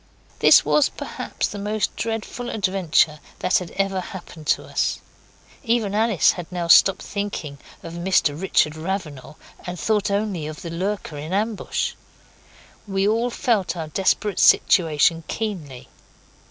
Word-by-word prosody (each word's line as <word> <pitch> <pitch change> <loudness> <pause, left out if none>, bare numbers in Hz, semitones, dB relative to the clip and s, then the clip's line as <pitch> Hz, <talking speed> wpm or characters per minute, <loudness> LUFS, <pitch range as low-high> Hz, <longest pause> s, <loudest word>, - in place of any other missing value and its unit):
This - - +7
was 300 - +3
perhaps - - -4
the 205 - -7
most 210 +1 -2
dreadful 230 +2 -4
adventure 185 -7 +1 0.2
that 185 - +2
had 180 - -7
then - - -15
ever 195 -1 0
happened 175 -5 -10
to - - +1
us. - - -1 0.6
Even 230 -4 0
Alice 215 -3 +3
had 175 -1 -8
now 175 -1 -3
stopped 195 +3 +6
thinking 200 -8 -5 0.2
of 165 - -8
Mr 170 -4 +1
Richard 155 -5 +2
Ravenal, 155 -6 -5 0.3
and 180 -1 -6
thought 210 +1 +1
only 200 -6 -1
of 155 0 -8
the 170 - -6
lurker 185 -2 -3
in 155 +5 -6
ambush. 215 +2 -1 0.9
We 195 0 0
all 230 +3 +1
felt 210 -9 0
our 160 -2 -5
desperate 195 +3 0
situation 165 -1 +4
keenly. 170 - -5
190 Hz, 140 wpm, -22 LUFS, 165-210 Hz, 0.9 s, This